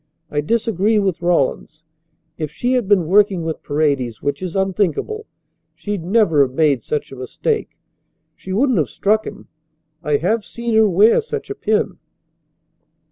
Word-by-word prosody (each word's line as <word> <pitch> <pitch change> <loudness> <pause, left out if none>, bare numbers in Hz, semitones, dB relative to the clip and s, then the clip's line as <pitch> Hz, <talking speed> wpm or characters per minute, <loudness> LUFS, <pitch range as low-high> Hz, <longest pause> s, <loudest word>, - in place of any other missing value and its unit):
I 145 - 0
disagree 215 +3 +1
with 195 -5 0
Rawlins. 160 -2 0 0.5
If 155 -3 -4
she 245 +11 -1
had 245 -6 0
been 195 -4 +3
working 195 0 +3
with 160 -1 -4
Paredes, 140 -6 -1
which 140 0 -3
is 185 -1 -5
unthinkable, 195 - -1 0.5
she'd 205 -5 -4
never 180 -5 +3
have 130 -2 +1
made 145 -5 +2
such 150 - -3
a - - -8
mistake. 425 - -3 0.6
She 190 - -9
wouldn't 240 +1 +2
have 145 - 0
struck 215 +2 0
him. - - -9 0.5
I 150 -3 +1
have 205 +9 0
seen 235 +1 -4
her 220 -1 +5
wear 210 - +5
such 445 -2 -6
a - - -4
pin." 210 - -1
190 Hz, 155 wpm, -19 LUFS, 155-220 Hz, 0.6 s, her